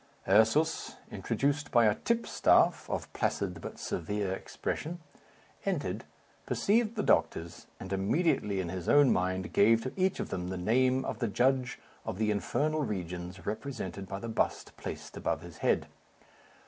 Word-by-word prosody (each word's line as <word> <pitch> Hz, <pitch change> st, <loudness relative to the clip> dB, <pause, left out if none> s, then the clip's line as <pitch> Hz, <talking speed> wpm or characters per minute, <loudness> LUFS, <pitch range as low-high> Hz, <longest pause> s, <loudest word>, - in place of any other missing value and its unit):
Ursus, 110 Hz, +11 st, +3 dB, 0.2 s
introduced 145 Hz, +1 st, -1 dB
by 120 Hz, -2 st, +5 dB
a 105 Hz, -, +5 dB
tipstaff, 235 Hz, -, +2 dB
of -, -, -4 dB
placid -, -, -1 dB
but -, -, -7 dB
severe 100 Hz, +3 st, -2 dB
expression, 165 Hz, -, -4 dB, 0.6 s
entered, -, -, -2 dB, 0.4 s
perceived 225 Hz, +2 st, +2 dB
the 210 Hz, -, -1 dB
doctors, 85 Hz, +1 st, +1 dB
and 95 Hz, +1 st, -5 dB
immediately 100 Hz, -, +1 dB
in 90 Hz, -2 st, -2 dB
his 90 Hz, -1 st, -4 dB
own 145 Hz, -3 st, +6 dB
mind, 95 Hz, 0 st, -1 dB
gave 115 Hz, +3 st, +5 dB
to 130 Hz, -, -4 dB
each 190 Hz, 0 st, +1 dB
of -, -, -3 dB
them 90 Hz, -2 st, -3 dB
the 95 Hz, 0 st, -3 dB
name 130 Hz, +7 st, +2 dB
of 110 Hz, -, -4 dB
the 120 Hz, -, 0 dB
judge 125 Hz, +4 st, +1 dB, 0.3 s
of -, -, -4 dB
the 110 Hz, 0 st, +1 dB
infernal 155 Hz, +9 st, 0 dB
regions 90 Hz, -, -4 dB
represented 105 Hz, -5 st, -4 dB
by 100 Hz, -, -4 dB
the 115 Hz, -, -6 dB
bust 110 Hz, -, -1 dB
placed -, -, -7 dB
above -, -, -1 dB
his 85 Hz, -2 st, -11 dB
head. -, -, +2 dB
110 Hz, 150 wpm, -31 LUFS, 95-140 Hz, 0.6 s, own